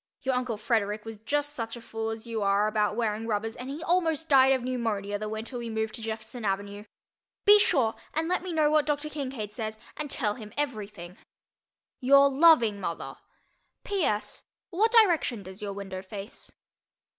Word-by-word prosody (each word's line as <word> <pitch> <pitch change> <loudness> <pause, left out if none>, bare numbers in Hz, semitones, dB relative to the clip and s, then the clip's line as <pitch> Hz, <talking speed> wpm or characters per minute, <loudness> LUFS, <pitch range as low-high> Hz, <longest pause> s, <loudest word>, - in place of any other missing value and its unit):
Your 265 - +1
uncle 250 -3 -1
Frederick 215 -1 -1
was 225 -1 -7
just 290 +7 -1
such 230 -3 -4
a - - -8
fool 225 -1 -4
as 225 0 -5
you 230 -2 -3
are 200 +1 +3
about 210 -1 +1
wearing 225 -1 -1
rubbers 220 +1 -2
and 250 +2 -7
he 300 +4 -5
almost 325 -3 +1
died 265 -1 +6
of 260 -2 -1
pneumonia 220 -5 -2
the 215 0 -4
winter 220 +3 -5
we 235 -1 -5
moved 220 0 -2
to - - -4
Jefferson 220 +2 -5
Avenue. 200 +1 -3 0.6
Be 415 +1 +9
sure 245 - +3 0.2
and 320 +1 -1
let 365 +1 0
me 365 0 -5
know 310 -2 +3
what 305 -1 +3
Dr. 295 0 -1
Kincaid 260 -8 -5
says 220 -1 -4 0.2
and 300 -1 -5
tell 210 -5 0
him 215 -2 -10
everything. 210 -10 -4 0.8
Your 275 +2 +6
loving 265 -8 +5
mother. 170 -3 -5 0.7
P. 400 -3 -1
S. 210 -5 -1 0.3
What 435 +6 +2
direction 345 - +4
does 190 +2 -10
your 200 -1 -4
window 195 -2 -6
face? 195 +2 -8
225 Hz, 180 wpm, -28 LUFS, 210-285 Hz, 0.8 s, Be